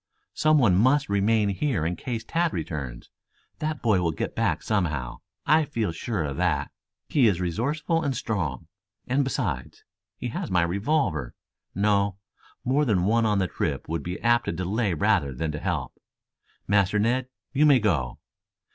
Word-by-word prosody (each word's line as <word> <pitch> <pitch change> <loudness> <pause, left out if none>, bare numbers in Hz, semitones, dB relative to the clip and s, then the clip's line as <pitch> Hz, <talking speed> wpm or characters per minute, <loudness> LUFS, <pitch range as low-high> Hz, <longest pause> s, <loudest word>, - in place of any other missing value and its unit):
"Some 155 0 +3
one 115 -10 +4
must 130 +9 +3
remain 105 +1 +2
here 100 - 0
in 85 +2 -1
case 115 +1 -4
Tad 170 0 0
returns. 70 -7 -5 0.5
That 155 -1 -3
boy 105 -6 +3
will 85 -2 +1
get 75 - -4
back 105 -9 0
somehow. 80 - -1 0.3
I 155 +1 +5
feel 115 - -2
sure 90 +2 -3
of 70 -2 -4
that. 80 -6 0 0.4
He 135 -6 +4
is 95 -5 +2
resourceful 145 - -1
and 140 -6 -1
strong. 85 - -3 0.4
And 135 +3 +1
besides, 100 - -3 0.3
he 125 - -4
has - - -4
my 90 -3 +3
revolver. 90 - 0 0.4
No; 100 0 +2 0.5
more 135 +4 +2
than 105 -10 +2
one 115 +2 +3
on 105 -1 +2
the 95 - +2
trip - - -3
would 80 -1 -2
be 90 +5 -5
apt 120 0 +3
to - - -1
delay 95 +3 -1
rather 70 -3 +1
than 80 +3 -2
to 75 - -5
help. - - -2 0.7
Master 100 0 +3
Ned, 120 +4 +1 0.3
you 150 +2 +4
may 140 -3 +7
go." 80 - 0
100 Hz, 165 wpm, -26 LUFS, 85-125 Hz, 0.7 s, may